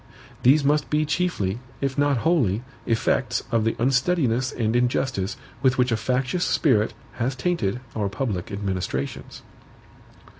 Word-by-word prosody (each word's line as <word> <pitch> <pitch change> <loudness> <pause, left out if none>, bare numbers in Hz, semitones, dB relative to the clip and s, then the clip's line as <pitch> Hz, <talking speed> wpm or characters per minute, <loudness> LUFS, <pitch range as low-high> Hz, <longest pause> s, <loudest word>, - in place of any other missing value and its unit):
These 140 +4 +5
must 150 +1 +2
be 155 0 +2
chiefly, 145 - -1 0.2
if 135 -1 -1
not 145 -1 +2
wholly, 125 - +2 0.2
effects 115 0 +1
of 115 -2 +2
the 115 - +1
unsteadiness 130 -1 +1
and 115 -1 -1
injustice 120 -4 0 0.2
with 130 -2 +3
which 125 -1 +2
a - - +3
factious 130 - 0
spirit 110 -8 +2 0.2
has 125 +2 -1
tainted 125 - -1
our 105 -3 0
public 100 -5 -3
administrations. 95 -9 -4
125 Hz, 135 wpm, -24 LUFS, 110-140 Hz, 0.2 s, These